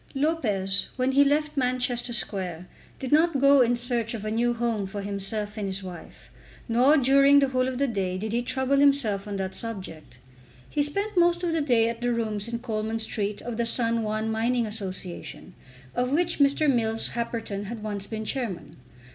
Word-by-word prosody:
Lopez 215 -11 0
when 255 0 +1
he 280 +1 +5
left 300 +2 +1
Manchester 250 -2 0
Square 185 -7 -2 0.3
did 260 - -5
not 315 -1 +4
go 275 0 +6
in 245 0 +3
search 235 -1 -1
of 215 -2 -6
a 215 - -2
new 240 +2 +1
home 230 -4 -1
for 200 +1 -6
himself 205 +2 -2
and 200 - -2
his 190 0 -3
wife, 180 -2 -11 0.4
nor 255 +6 +4
during 275 +1 +5
the 275 -1 +4
whole 255 0 +1
of 260 -1 -3
the 280 - +2
day 195 -7 -2
did 215 +3 -4
he 240 - +1
trouble 265 +2 0
himself 275 -8 +3
on 205 - -4
that 190 -1 -3
subject. 185 - -7 0.5
He 295 - -1
spent 400 +9 -1
most 345 +1 +3
of 345 - 0
the 325 -1 0
day 240 -6 +3
at 230 0 -4
the 245 0 +1
rooms 220 -3 -2
in 235 0 -3
Coleman 225 -2 -3
Street 210 -2 -3
of 240 -2 -5
the 235 - 0
San 230 -1 +1
Juan 215 0 -2
Mining 235 +2 +1
Association, 190 -4 -7 0.4
of 250 +1 -1
which 340 +3 +1
Mr. 285 +2 +3
Mills 225 -4 +1
Happerton 225 -4 -4
had 220 +1 -7
once 205 -2 -4
been 220 0 -5
Chairman. 230 -8 -4
235 Hz, 190 wpm, -26 LUFS, 210-265 Hz, 0.5 s, go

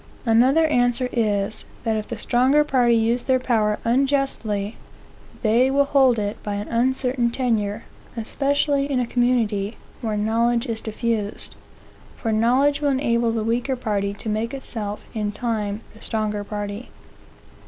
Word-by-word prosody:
Another 255 +8 +4
answer 245 -3 +2
is, 210 -2 0 0.2
that 225 -1 0
if 215 -1 -3
the 235 - -5
stronger 260 +7 +3
party 245 -5 +3
use 230 +2 +1
their 260 -1 +3
power 220 -4 +1
unjustly, 235 -5 0 0.7
they 235 +4 +4
will 280 +1 +3
hold 265 -4 +4
it 205 0 -3
by 205 -1 -3
an 205 +1 -4
uncertain 250 0 +1
tenure, 225 -4 -1 0.3
especially 280 +4 0
in 260 - +1
a 250 - +1
community 230 -4 0 0.2
where 220 -3 -2
knowledge 230 +3 +1
is 230 -3 -4
diffused; 220 -1 -3 0.6
for 225 - -2
knowledge 255 +7 +3
will 290 - +2
enable 235 -4 +1
the 225 -1 -1
weaker 240 +4 0
party 205 -5 -1
to 215 - -9
make 220 +4 -1
itself 215 -6 -6
in 210 -2 -2
time 210 -2 -2
the 220 - -16
stronger 215 -2 -2
party. 205 +2 -5
235 Hz, 145 wpm, -23 LUFS, 215-255 Hz, 0.7 s, Another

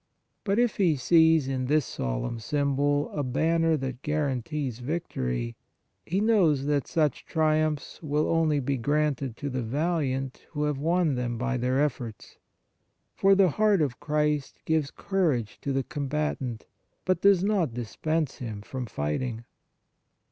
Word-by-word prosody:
But 200 0 0
if 240 -1 +2
he 175 -6 +3
sees 160 +1 +4
in 130 -1 -1
this 150 -1 +2
solemn - - -3
symbol 145 +3 0
a 150 - -2
banner 160 +5 +2
that 130 -2 -5
guarantees 140 -3 -2
victory, 65 - -3 0.5
he 185 +4 0
knows 185 -11 +3
that 145 -2 0
such 155 -5 0
triumphs 155 -2 0
will 150 -1 0
only 160 -3 +2
be 135 +1 -1
granted 140 -2 0
to 145 - -4
the 130 0 -2
valiant 135 0 -2
who 150 -1 -1
have 150 -2 -1
won 165 0 +2
them 120 -2 -2
by 130 +2 -1
their 125 +2 +1
efforts, 125 -7 -3 0.8
for 195 0 +4
the 190 -2 +5
Heart 205 0 +3
of 130 -4 -3
Christ 150 -1 0
gives 160 -3 +1
courage 155 - -1
to 140 - -2
the 135 0 0
combatant, 140 -5 -3 0.4
but 185 -1 +1
does 195 -2 +5
not 190 - +1
dispense 150 +6 -2
him 110 -5 -6
from 130 +1 -5
fighting. 110 - -3
145 Hz, 145 wpm, -27 LUFS, 125-160 Hz, 0.8 s, the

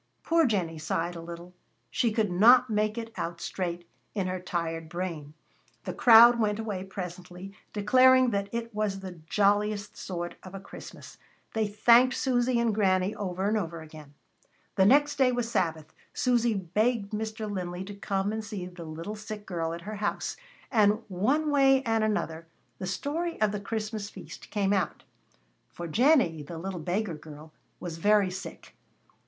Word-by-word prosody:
Poor 330 -3 +3
Jennie 175 -8 -1
sighed 165 +3 -2
a 165 - -7
little. 170 +1 -9 0.4
She 235 - +1
could 215 -3 0
not 240 +6 +6
make 215 +1 0
it 230 -1 -6
out 170 0 -4
straight 175 -2 -4 0.3
in 195 -3 0
her 185 0 -2
tired 165 -2 -3
brain. 165 -4 -5 0.5
The - - -4
crowd 235 0 +8
went 210 -2 +1
away 210 -4 -4
presently, 180 0 -8 0.2
declaring 255 +4 +5
that 200 -1 -1
it 230 0 -4
was 205 -2 -2
the 185 -3 -8
jolliest 205 0 +1
sort 175 -2 -5
of 185 +1 -10
a - - -5
Christmas. 195 - -12 0.3
They 220 -1 +1
thanked 235 +5 +5
Susy 245 -2 +1
and 235 -2 +1
Granny 190 -1 +2
over 195 -2 -3
and 215 - +1
over 170 -5 -3
again. 155 -2 -13 0.6
The 190 - +4
next 290 +5 +4
day 260 -2 +4
was 240 -1 -2
Sabbath. 160 -6 -1 0.2
Susy 240 -3 +2
begged 200 +4 0
Mr. 220 0 -4
Linley 180 -2 -4
to 205 +2 -8
come 200 0 -2
and 220 0 -3
see 205 -4 -6
the 175 -2 -9
little 165 +7 -6
sick 210 0 -8
girl 165 -3 -3
at 170 +1 -6
her 210 +4 -6
house. 205 +1 -2 0.4
And 215 -1 +3
one 270 +12 +1
way 270 -1 +4
and 225 -3 +1
another, 165 -6 -2 0.3
the 185 - -4
story 310 - -3
of 215 -1 +2
the 210 - -3
Christmas 215 -1 -4
feast - - -11
came 200 -1 +1
out. 190 -5 -1 0.7
For 175 - -7
Jennie, 225 - +3
the 165 +3 -8
little 185 +1 -5
beggar 180 +4 -2
girl, 150 0 -11 0.3
was 165 -2 -6
very 205 0 +3
sick. 185 -3 -9
200 Hz, 170 wpm, -28 LUFS, 175-225 Hz, 0.7 s, crowd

